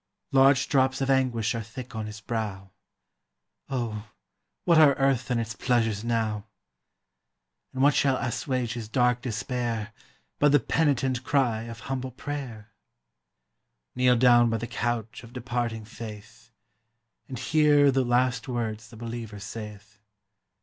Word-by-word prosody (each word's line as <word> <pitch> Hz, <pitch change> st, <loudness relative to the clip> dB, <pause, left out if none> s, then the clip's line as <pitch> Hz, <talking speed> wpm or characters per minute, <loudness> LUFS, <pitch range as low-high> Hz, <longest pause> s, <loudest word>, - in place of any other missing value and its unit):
Large 135 Hz, 0 st, +5 dB
drops 130 Hz, -1 st, +2 dB
of 135 Hz, 0 st, +1 dB
anguish 125 Hz, -4 st, +1 dB
are 115 Hz, -, -3 dB
thick 120 Hz, +3 st, -9 dB
on 110 Hz, -1 st, -3 dB
his 105 Hz, +1 st, -9 dB
brow; 105 Hz, -4 st, -4 dB, 1.0 s
Oh, 115 Hz, -5 st, -3 dB, 0.6 s
what 170 Hz, -2 st, +5 dB
are 145 Hz, -3 st, +7 dB
earth 135 Hz, -2 st, +1 dB
and 125 Hz, -2 st, +1 dB
its 115 Hz, -1 st, -3 dB
pleasures 115 Hz, -3 st, 0 dB
now! 110 Hz, -3 st, -1 dB, 1.3 s
And 130 Hz, 0 st, -1 dB
what 145 Hz, 0 st, +6 dB
shall 135 Hz, -2 st, +2 dB
assuage 120 Hz, 0 st, -2 dB
his 115 Hz, -3 st, -6 dB
dark 125 Hz, 0 st, +2 dB
despair, 115 Hz, -2 st, -3 dB, 0.5 s
But 145 Hz, -1 st, +4 dB
the 145 Hz, -, +7 dB
penitent 135 Hz, -5 st, +1 dB
cry 120 Hz, -6 st, +1 dB
of 115 Hz, -2 st, -9 dB
humble 130 Hz, +1 st, -4 dB
prayer? 125 Hz, -5 st, -7 dB, 1.2 s
Kneel 125 Hz, 0 st, +4 dB
down 120 Hz, -1 st, +5 dB
by 115 Hz, -, 0 dB
the 115 Hz, -, -4 dB
couch 120 Hz, -1 st, -3 dB
of 115 Hz, 0 st, -13 dB
departing 120 Hz, -3 st, -3 dB
faith, 115 Hz, +1 st, -10 dB, 0.8 s
And 130 Hz, -, -6 dB
hear 145 Hz, +2 st, +4 dB
the 135 Hz, 0 st, +2 dB
last 125 Hz, 0 st, +1 dB
words 110 Hz, -3 st, -3 dB
the 115 Hz, -, -13 dB
believer 115 Hz, -2 st, -6 dB
saith. 105 Hz, 0 st, -9 dB
120 Hz, 135 wpm, -27 LUFS, 110-130 Hz, 1.3 s, are